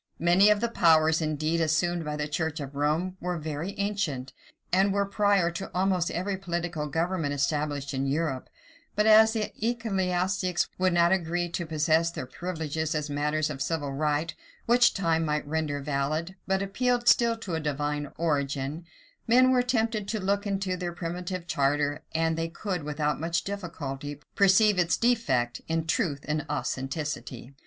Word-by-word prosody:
Many 175 +5 +5
of 210 0 +3
the 235 - +2
powers, 160 -6 +4
indeed, 155 +2 0
assumed 165 +2 +1
by 150 -1 -3
the 150 0 -2
church 160 +1 -2
of 140 -1 -6
Rome, 155 +6 0
were 180 0 -2
very 160 +5 -5
ancient, 200 -11 -2 0.4
and 195 +2 +4
were 200 0 +1
prior 200 -3 +2
to 170 +3 -6
almost 185 -2 +1
every 190 +3 -2
political 170 -4 -3
government 160 -1 -1
established 145 -1 -1
in 135 +1 -1
Europe: 140 -2 -1 0.5
but 210 0 +2
as 220 0 +7
the 215 -2 -2
ecclesiastics 190 -6 0
would 185 -1 +2
not 170 0 +4
agree 175 -1 0
to 170 0 -4
possess 160 +1 +2
their 170 - -6
privileges 160 -1 -3
as 150 -1 -2
matters 150 +2 0
of 135 -2 -6
civil 145 0 -1
right, 150 +3 0 0.3
which 240 +1 +4
time 165 -4 +1
might 150 -1 -1
render 150 -2 -1
valid, 150 +5 -2
but 190 0 +1
appealed 245 +4 0
still 235 -1 +5
to 200 -6 -6
a 160 - 0
divine 145 -1 -2
origin, 145 0 -1 0.4
men 255 +2 +5
were 255 -1 +4
tempted 225 -4 0
to 220 +1 -2
look 200 +2 0
into 195 -2 -1
their 175 -1 -4
primitive 175 +1 -4
charter, 145 -1 0
and 160 0 +1
they 165 0 -2
could, 180 +1 -4
without 150 0 -1
much 165 +2 -1
difficulty, 145 -8 -5
perceive 200 0 +4
its 175 -1 +2
defect 135 - +1
in 165 0 -1
truth 160 - 0
and 150 0 -1
authenticity. 140 -2 -4
165 Hz, 165 wpm, -27 LUFS, 150-190 Hz, 0.5 s, as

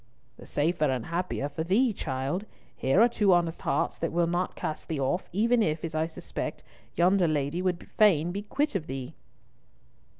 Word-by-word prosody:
"The - - -13
safer 155 +1 +1
and 130 -4 0
the - - -10
happier 170 -4 -2
for 145 +2 -4
thee, 215 +8 +3
child. 140 +6 -3 0.3
Here 135 +8 +2
are 235 - +8
two 210 -5 +3
honest 170 -1 +1
hearts - - 0
that 165 - -1
will 170 0 +2
not 175 +2 -1
cast 155 - -4
thee 155 -3 -2
off, 135 +7 -1
even 230 +6 +3
if, 155 -5 0
as 165 - -5
I 155 +1 0
suspect, 165 - -6 0.3
yonder 180 +1 +4
lady 150 +2 0
would 180 -2 -2
fain 175 -6 +3
be 200 +3 -3
quit 285 +8 -1
of 180 -6 -2
thee." 130 -1 -5
170 Hz, 190 wpm, -28 LUFS, 155-190 Hz, 0.3 s, are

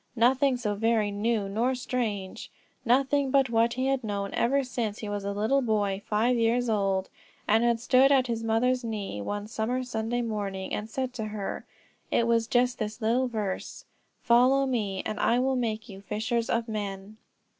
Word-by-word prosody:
Nothing 255 +3 +3
so 215 -4 -2
very 220 0 +1
new 210 0 0
nor 235 +6 0
strange, 225 -6 -3 0.3
nothing 270 +3 +2
but 270 -2 +3
what 230 +1 +3
he 255 +2 -1
had 270 -1 0
known 200 -2 -3
ever 275 +4 +2
since 230 -4 -3
he 215 - -6
was 205 -1 -3
a 200 - -2
little 220 +7 +1
boy 205 -4 0
five 225 +4 +2
years 235 +1 +1
old, 195 -3 0 0.4
and 220 +2 +4
had 235 -1 +2
stood 255 +3 +4
at 265 -2 +4
his 230 -2 -3
mother's 245 +3 +1
knee, 210 - -4
one 205 - -4
summer 225 +4 -2
Sunday 240 0 -2
morning, 200 -4 -4
and 210 +1 -3
said 260 +3 -2
it - - -29
to 220 -3 -4
her; 210 -2 -5 0.4
it 235 - +2
was 230 -1 +2
just 245 +1 +1
this 215 +1 -4
little 240 +3 +1
verse: 210 -5 -4 0.4
"Follow 255 +3 +4
me, 210 -7 -2
and 215 - -3
I 235 - +3
will 260 +1 +1
make 225 -2 -2
you 195 -3 -10
fishers 225 +4 -2
of 230 0 0
men." 205 -1 -5
225 Hz, 185 wpm, -27 LUFS, 210-250 Hz, 0.4 s, and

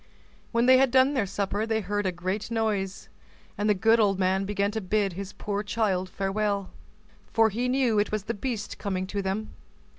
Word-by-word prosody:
When 235 0 +2
they 255 0 +7
had 270 -1 +4
done 260 +3 +4
their 225 -8 0
supper, 200 +2 -2
they 220 -1 +1
heard 205 -1 -1
a - - +1
great 185 +5 -3
noise, 210 -4 -1 0.5
and 210 +1 0
the 210 - +4
good 225 +4 +4
old 200 -3 +3
man 190 +1 +1
began 200 0 0
to 220 +1 -3
bid 200 0 0
his 195 +2 -6
poor 205 -1 -3
child 205 -4 -1
farewell, 200 0 -1 0.6
for 225 -1 +4
he 245 +5 -1
knew 250 -5 +2
it 205 - 0
was 215 -2 -1
the 230 - -3
beast 225 -1 -4
coming 185 -2 -2
to 200 +1 -3
them. 195 +3 -3
205 Hz, 200 wpm, -27 LUFS, 195-225 Hz, 0.6 s, they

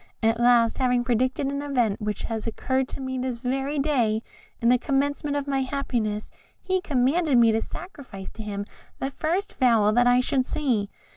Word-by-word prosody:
At 225 +1 +2
last, 240 -1 +4
having 250 -2 +2
predicted 255 +3 0
an 280 +1 -2
event 245 -8 0
which 210 -1 -3
has 225 -1 -3
occurred 260 +3 -1
to - - -7
me 260 -1 -3
this 250 -1 -2
very 270 +3 -1
day, 240 -7 +1 0.4
and 235 +1 +3
the 250 - +4
commencement 285 +2 0
of 285 -1 -1
my 275 -1 0
happiness, 240 -6 -2 0.3
he 375 -1 -1
commanded 280 +1 +2
me 230 -1 +6
to 220 0 +1
sacrifice 260 - -8
to 225 - -9
him 205 -1 -4 0.3
the 270 - -3
first 350 +8 -2
fowl 230 -5 +4
that 245 +1 +4
I 245 0 +5
should 255 +1 +1
see. 245 -8 -1
255 Hz, 185 wpm, -25 LUFS, 230-280 Hz, 0.4 s, me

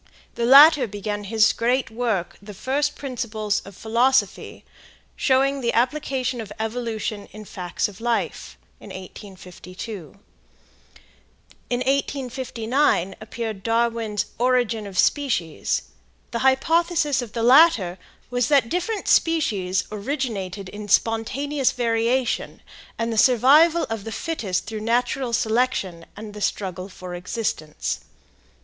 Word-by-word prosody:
The 235 - -1
latter 285 0 +8
began 205 0 -5
his 215 +1 +3
great 245 +1 0
work, 220 -6 -2
the 205 0 -10
"First 280 +7 -1
Principles 225 -6 -3
of 200 -1 -12
Philosophy," 245 +4 0 0.5
showing 275 +1 +2
the 235 -1 0
application 255 -1 0
of 210 -2 -9
evolution 220 -2 -3
in 215 - -10
the - - -11
facts 180 -3 -3
of 205 0 -13
life, 235 0 -2 0.2
in - - -12
1852. 185 -1 -10 1.5
In 245 0 -1
1859 255 -6 0
appeared 220 -2 -5
Darwin's 230 -1 0
"Origin 240 -4 +1
of 190 -2 -9
Species." 225 - 0 0.5
The 235 - -2
hypothesis 310 +3 +2
of 230 -3 -8
the 230 - -2
latter 240 - +5 0.3
was 245 -1 +1
that 275 -5 +3
different 375 - -2
species 200 - +2
originated 210 -5 -4
in 210 +1 -8
spontaneous 255 +7 +1
variation, 235 +1 0 0.3
and 230 0 -1
the 220 - +1
survival 285 +9 +5
of 225 -3 -4
the 225 - -5
fittest 230 - -3
through 220 -1 -5
natural 245 +3 0
selection 220 -7 0
and 210 0 -8
the 210 - -9
struggle 190 -2 -3
for 185 -1 -9
existence. 175 -4 -3
230 Hz, 120 wpm, -23 LUFS, 205-260 Hz, 1.5 s, latter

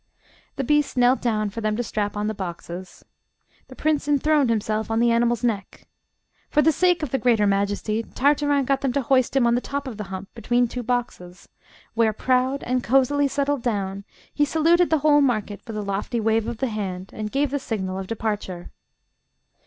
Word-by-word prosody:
The 275 - -2
beast 295 +1 +1
knelt 250 +1 +4
down 215 -3 0
for 230 - -6
them 215 -1 0
to 240 - -1
strap 210 -2 -3
on 210 - -1
the 215 - -1
boxes. 180 -1 -7 0.6
The - - -12
prince 305 -2 0
enthroned 290 -1 +3
himself 220 0 -1
on 225 0 +1
the 235 0 +3
animal's 235 0 +1
neck. 215 -4 -3 0.6
For 300 - +3
the 320 - +5
sake 355 +1 +2
of 285 - -3
the 270 - 0
greater 225 -2 +3
majesty, 200 +2 0
Tartarin 285 +3 +1
got 275 +1 +1
them 270 -3 0
to 280 - 0
hoist 255 +1 +2
him 265 -3 +4
on 235 - +3
the 245 - +1
top 280 +1 -4
of 235 -5 -6
the 210 - -5
hump 190 +1 -7
between 240 +2 +1
two 250 +2 -5
boxes, 220 -7 -4 0.4
where, 225 -1 +2
proud, 255 +4 0
and 250 0 -1
cosily 270 +3 +3
settled 280 0 -1
down, 200 -4 -2 0.3
he 295 - +2
saluted 330 +4 +3
the 320 - +3
whole 295 -1 +6
market 215 -6 0
with 220 -2 -5
a 210 - -3
lofty 200 +4 -2
wave 225 0 +1
of 235 -1 -4
the 265 +1 -1
hand, 190 -3 -5
and 215 -1 -5
gave 280 0 0
the 285 - -1
signal 190 -7 -3
of 190 - -6
departure. 210 -5 -4
235 Hz, 200 wpm, -23 LUFS, 210-275 Hz, 0.6 s, whole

